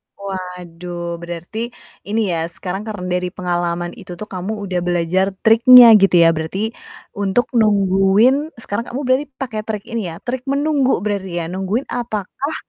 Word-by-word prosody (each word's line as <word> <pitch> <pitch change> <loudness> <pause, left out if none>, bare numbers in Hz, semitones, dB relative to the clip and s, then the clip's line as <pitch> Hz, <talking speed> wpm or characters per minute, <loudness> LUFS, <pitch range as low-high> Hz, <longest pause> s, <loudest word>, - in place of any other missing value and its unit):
Waduh, 180 -3 -6
berarti 175 +8 -6 0.3
ini 210 -1 0
ya, 165 -1 -1
sekarang 185 +4 -6
karena 210 -4 -6 0.2
dari 180 0 -5
pengalaman 175 -1 -2
itu 175 - -9
tuh 210 +5 -9
kamu 185 +2 -4
udah 185 -2 -2
belajar 180 +3 0
triknya 235 +2 +8
gitu 195 -2 +4
ya, 165 - +6
berarti, 165 +7 -2 0.5
untuk 200 +4 0
nungguin 210 - +3
sekarang 230 0 -4
kamu 255 - -5
berarti 260 +3 +2
pakai 245 -5 -4
trik 210 -2 -3
ini 225 -5 -3
ya, 170 +3 -8
trik 255 +1 -4
menunggu 280 - +1
berarti 190 -4 -2
ya. - - -4
Nungguin 190 +7 -2
apakah 240 +5 -4
195 Hz, 150 wpm, -19 LUFS, 180-230 Hz, 0.5 s, triknya